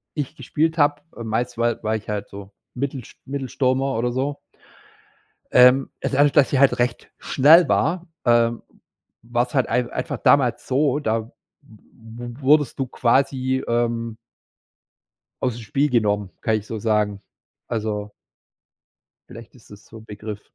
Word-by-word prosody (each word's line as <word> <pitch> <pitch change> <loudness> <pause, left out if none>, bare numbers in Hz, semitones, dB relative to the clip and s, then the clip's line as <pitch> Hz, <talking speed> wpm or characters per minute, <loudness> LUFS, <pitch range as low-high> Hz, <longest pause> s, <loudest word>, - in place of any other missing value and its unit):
ich 145 -1 -4
gespielt 160 0 -1
habe 145 0 +2 0.2
meist 115 +2 -2
war 120 0 0
war 110 0 0
ich 110 -1 -7
halt 105 -1 -3
so 100 0 -10 0.2
Mittelsch 135 -1 -5
Mittelstürmer 135 0 -1
oder 120 +2 0
so. 135 +3 -2 1.1
Ähm, 125 +2 +5
dadurch 145 +1 +2
dass 145 -3 +3
ich 135 - +2
halt 140 0 +4
recht 120 -1 -2
schnell 160 +6 +5
war, 170 +4 0 0.2
ähm, 120 -1 +2 0.6
war 120 +1 0
es 125 - -16
halt 130 -2 +2
ei 125 +1 0
einfach - - -4
damals - - +2
so, 140 +1 +1
da 115 -5 0
w 110 - -15 0.3
w 120 0 -12
wurdest 145 0 +3
du 135 - -1
quasi, 130 +1 +1
ähm 115 -1 -1 1.3
Aus 125 -3 0
'm - - -8
Spiel 140 +7 0
genommen, 105 -5 +1
kann 110 - +1
ich 105 -1 -6
so 110 - -5
sagen. 105 -2 0 0.5
Also 105 -2 -3 1.2
Vielleicht 115 +1 -12
ist 125 - -20
es 105 0 -14
so 115 - -13
Begriff. 105 -1 -8
120 Hz, 145 wpm, -22 LUFS, 110-135 Hz, 1.3 s, Ähm